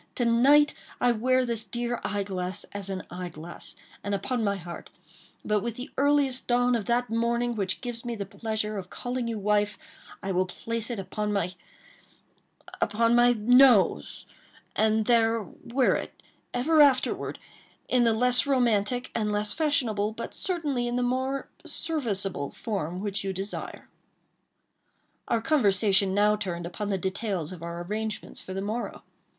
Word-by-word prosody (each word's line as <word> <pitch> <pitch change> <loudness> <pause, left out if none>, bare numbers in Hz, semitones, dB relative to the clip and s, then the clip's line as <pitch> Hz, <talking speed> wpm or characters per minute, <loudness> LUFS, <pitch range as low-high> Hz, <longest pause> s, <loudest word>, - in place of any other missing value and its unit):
To 245 - 0
night 275 +6 +5 0.3
I 245 - +4
wear 255 +3 +2
this 230 -2 -1
dear 240 +3 -3
eye 205 0 -1
glass, 185 -1 -1
as 200 -1 -3
an 190 -1 -3
eye 180 0 -5
glass, 165 +2 -7 0.3
and 200 0 -1
upon 240 +4 -2
my 200 -1 +1
heart; 175 -2 -8 0.6
but 210 0 +2
with 235 +1 -3
the 250 +4 -7
earliest 280 -2 +2
dawn 245 0 +3
of 220 -4 -2
that 240 0 0
morning 235 +1 +1
which 195 -4 -2
gives 240 -2 -5
me 240 -1 -3
the 200 -2 -4
pleasure 215 +1 -2
of 180 -1 -9
calling 245 -1 -3
you 230 -1 -2
wife, 205 0 +1 0.5
I 195 - -2
will 185 0 +1
place 230 +5 -4
it 240 - -3
upon 210 +2 -3
my—upon 205 +4 -4
my 240 0 +6
nose,—and 220 - +2
there 230 -1 +3
wear 245 +7 0
it - - -8 0.3
ever 300 +6 +3
afterward, 275 -3 +3 0.5
in 250 -1 +3
the 230 -1 +4
less 250 +4 +3
romantic, 245 -2 +1
and 215 -2 0
less 210 0 0
fashionable, 230 -9 +1
but 230 - -6
certainly 295 -10 -2
in 240 - -2
the 250 - +1
more 260 +2 -1 0.2
serviceable, 200 - -2
form 185 -5 -4
which 200 -1 -1
you 195 -1 -2
desire." 195 +2 -5 1.4
Our 230 -1 0
conversation 200 - +3
now 210 +1 +4
turned 175 -4 -4
upon 200 +4 -4
the 195 - +1
details 190 -3 -2
of 180 -3 -9
our 170 +1 -5
arrangements 215 +3 -4
for 185 - -7
the 195 - -2
morrow. 220 +4 -4
220 Hz, 155 wpm, -27 LUFS, 195-245 Hz, 1.4 s, my